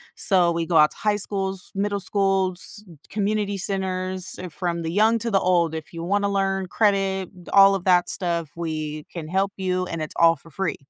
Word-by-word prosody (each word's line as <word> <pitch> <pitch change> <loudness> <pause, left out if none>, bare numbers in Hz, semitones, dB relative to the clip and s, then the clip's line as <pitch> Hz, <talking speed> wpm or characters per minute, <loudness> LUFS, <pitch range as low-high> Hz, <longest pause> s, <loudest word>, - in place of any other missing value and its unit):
so 180 -4 +4
we 165 0 -1
go 165 -1 +1
out 150 0 +6
to - - -12
high 210 -1 +1
schools, 195 -2 -2
middle 200 +1 -1
schools, 195 0 +1 0.3
community 205 -1 -1
centers- 185 -1 -2
from 170 0 -3
the 165 - -3
young 220 +5 +3
to 230 0 -3
the 195 - +3
old, 175 -3 +2
if 160 +1 -8
you 165 0 -6
wanna 200 +3 0
learn 195 -1 -1
credit, 195 -2 +1 0.2
all 195 0 +7
of 190 -1 -5
that 180 -1 +4
stuff, 170 -4 -2
we 155 -2 -4
can 165 -3 -6
help 195 +3 0
you 185 -1 -1
and 165 -2 -5
it's 155 - -4
all 165 0 +6
for 165 +3 -18
free. 185 +4 -2
190 Hz, 195 wpm, -23 LUFS, 170-195 Hz, 0.3 s, all